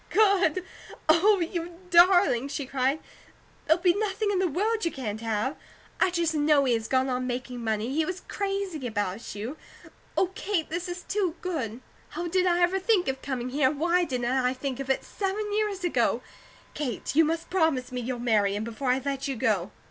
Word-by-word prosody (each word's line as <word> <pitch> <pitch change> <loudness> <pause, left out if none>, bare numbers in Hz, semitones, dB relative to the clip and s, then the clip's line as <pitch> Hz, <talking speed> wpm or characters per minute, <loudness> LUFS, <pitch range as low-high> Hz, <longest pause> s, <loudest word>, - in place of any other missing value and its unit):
Good! 385 -4 +3 0.4
Oh, 375 +6 +5
you 340 0 -3
darling!" 350 -7 +5
she 280 0 -4
cried. 270 +3 0 0.7
"There'll 335 +2 +3
be 355 -2 +5
nothing 410 +1 -1
in 385 - +1
the 375 - +2
world 430 +8 0
you 335 - +1
can't 220 -5 -5
have! 225 +4 -1 0.4
I - - +4
just 340 -2 0
know 295 -2 +3
he 250 - +3
had 225 -1 -2
gone 260 0 +2
on 255 -1 -1
making 250 -1 -4
money; 220 +3 -1
he 320 +2 +2
was 370 +3 -4
crazy 390 -8 -3
about 205 -1 -3
you. 230 +9 -5 0.6
Oh, 375 - +2
Kate, 385 -7 -2
this 345 +2 -3
is 355 0 -5
too 385 -5 -1
good! 260 - -3 0.3
How 340 +3 -4
did 365 +1 +2
I 350 0 +2
ever 365 +2 +3
think 380 -2 +2
of 265 0 -2
coming 255 -2 -3
here, 270 -1 +3
and 285 0 -5
why 345 +2 +3
didn't 250 -6 -1
I 255 -1 +1
think 260 0 -4
of 270 -1 -5
it 265 - +1
seven 410 +1 -3
years 415 -3 -1
ago? 350 - +1 0.5
Kate, 275 -4 -3
you 325 - +7
must 325 +1 -2
promise 320 -9 +1
me 250 -1 -3
you'll 245 +1 -3
marry 215 -4 +2
him, 210 - -2
before 230 +4 -3
I 255 +1 +3
let 275 0 -2
you 270 - -2
go." 205 -5 +1
300 Hz, 200 wpm, -27 LUFS, 250-360 Hz, 0.7 s, you